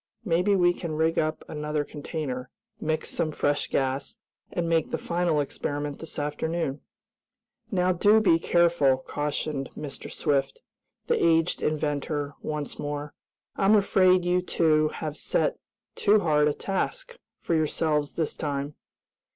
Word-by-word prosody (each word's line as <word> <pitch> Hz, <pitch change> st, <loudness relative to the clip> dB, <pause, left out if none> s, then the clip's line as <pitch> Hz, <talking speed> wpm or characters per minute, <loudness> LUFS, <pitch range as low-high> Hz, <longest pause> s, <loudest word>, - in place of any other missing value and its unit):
"Maybe 180 Hz, +2 st, +3 dB
we 175 Hz, -2 st, +4 dB
can 170 Hz, -3 st, -5 dB
rig 160 Hz, +1 st, +2 dB
up 155 Hz, 0 st, -1 dB
another 150 Hz, 0 st, -2 dB
container, 145 Hz, -4 st, -5 dB, 0.3 s
mix 155 Hz, 0 st, -1 dB
some 155 Hz, -, -1 dB
fresh 145 Hz, -1 st, 0 dB
gas, 135 Hz, -, -1 dB, 0.3 s
and 170 Hz, -1 st, -1 dB
make 165 Hz, -2 st, +1 dB
the -, -, -1 dB
final 170 Hz, -3 st, 0 dB
experiment 145 Hz, 0 st, -3 dB
this 165 Hz, -, -7 dB
afternoon." 150 Hz, 0 st, -2 dB, 0.9 s
"Now 185 Hz, -4 st, +2 dB
do 205 Hz, +5 st, +5 dB
be 170 Hz, -6 st, +4 dB
careful," 170 Hz, -6 st, +3 dB
cautioned 145 Hz, +1 st, -3 dB
Mr. 145 Hz, -2 st, -7 dB
Swift, 135 Hz, -2 st, 0 dB, 0.4 s
the -, -, +1 dB
aged 165 Hz, 0 st, +3 dB
inventor, 145 Hz, -1 st, -1 dB
once 150 Hz, -1 st, -4 dB
more. 145 Hz, 0 st, -4 dB, 0.4 s
"I'm 200 Hz, +2 st, +5 dB
afraid 185 Hz, -3 st, +4 dB
you 180 Hz, +1 st, +2 dB
two 155 Hz, -3 st, +2 dB
have 155 Hz, -1 st, -5 dB
set -, -, 0 dB, 0.3 s
too 210 Hz, 0 st, +3 dB
hard 150 Hz, -3 st, +3 dB
a 150 Hz, -, +2 dB
task 480 Hz, -, -3 dB, 0.2 s
for -, -, -2 dB
yourselves 155 Hz, -2 st, +1 dB
this 160 Hz, -3 st, -2 dB
time." 145 Hz, -1 st, -3 dB
155 Hz, 135 wpm, -27 LUFS, 145-175 Hz, 0.9 s, do